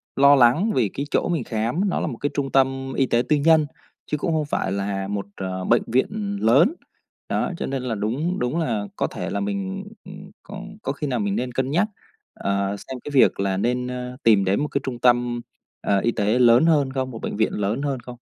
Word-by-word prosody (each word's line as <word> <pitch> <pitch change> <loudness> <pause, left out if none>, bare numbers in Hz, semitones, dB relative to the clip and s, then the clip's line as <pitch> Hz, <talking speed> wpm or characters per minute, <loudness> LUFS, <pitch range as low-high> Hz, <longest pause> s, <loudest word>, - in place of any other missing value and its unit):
lo 140 +1 +7
lắng 135 - +4
vì 115 -6 +2
cái 140 - -4
chỗ - - +1
mình 165 -7 0
khám, 120 - -1
nó - - -1
là - - -1
một 120 - -5
cái 145 - -1
trung 135 -2 -2
tâm 135 0 +1
y 135 - +3
tế 120 -2 +2
tư 150 - +5
nhân, 155 +1 +4 0.5
chứ 150 - +1
cũng 160 +3 -1
không 155 -2 0
phải 120 -9 -1
là 100 0 -2
một, 100 0 -3
à, 95 - -4 0.2
bệnh 120 - +4
viện 200 - -1
lớn. 140 - +5 0.6
Đó, - - 0
cho - - -3
nên 135 -1 -3
là 120 -3 -2
đúng 130 - -2
đúng 125 +7 -1
là 115 -10 -1
có - - 0
thể - - -5
là - - -2
mình, 195 -1 -3 0.2
ừm, 185 0 -11
có 205 0 -8 0.2
có - - -1
khi 150 - -4
nào 125 -3 -1
mình 100 -1 -1
nên 125 +3 -2
cân 130 +2 -1
nhắc, 180 +8 +2 0.5
à, 100 0 -1
xem 130 +4 -8
cái 145 - -6
việc 130 - +4
là 95 -1 0
nên, 125 +4 0
a, 125 0 -5
tìm 105 -4 +5
đến 95 +2 +1
một 150 - 0
cái 140 - -2
trung 125 -2 -4
tâm, 120 -1 +2 0.4
à, 100 -1 +2
y 120 - +1
tế 110 +2 +1
lớn 120 +3 +6
hơn 145 -5 +3
không, 130 -1 -2
một 115 - -8
bệnh - - -4
viện 110 - +1
lớn 105 +5 -1
hơn 140 -3 -2
không? 120 0 -10
125 Hz, 235 wpm, -23 LUFS, 115-150 Hz, 0.6 s, lo